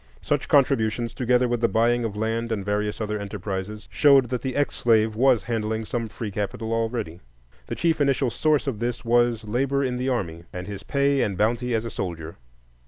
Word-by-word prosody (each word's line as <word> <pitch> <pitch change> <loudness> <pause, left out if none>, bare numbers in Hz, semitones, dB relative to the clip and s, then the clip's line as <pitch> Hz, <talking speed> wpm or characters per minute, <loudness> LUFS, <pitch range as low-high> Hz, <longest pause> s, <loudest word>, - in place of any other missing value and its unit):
Such - - 0
contributions, 120 -4 +2
together 125 0 +2
with 120 -1 -1
the 115 - +4
buying 120 +2 +2
of 105 -2 -4
land 115 +2 -1
and 100 -4 -2
various 105 0 -1
other 105 -1 -2
enterprises, 100 +1 -5
showed 140 -4 +5
that 125 -1 -2
the 130 -2 -3
ex 145 0 +1
slave 110 -2 +2
was 125 -3 +3
handling 110 0 -2
some 115 0 -3
free 105 0 -6
capital 105 +3 -3
already. 115 -7 -2 0.5
The - - -4
chief 165 -3 +1
initial 135 -3 +2
source 155 +2 +1
of 130 -7 -3
this 120 0 -3
was 120 -1 +2
labor 135 +6 0
in 125 -2 -1
the 130 +2 -1
army, 85 -9 -3
and 90 0 -6
his 100 -1 -7
pay 140 +3 +1
and 100 -3 -1
bounty 120 +3 +1
as 110 +1 -1
a 115 - -5
soldier. 85 -4 -5
115 Hz, 195 wpm, -24 LUFS, 105-125 Hz, 0.5 s, showed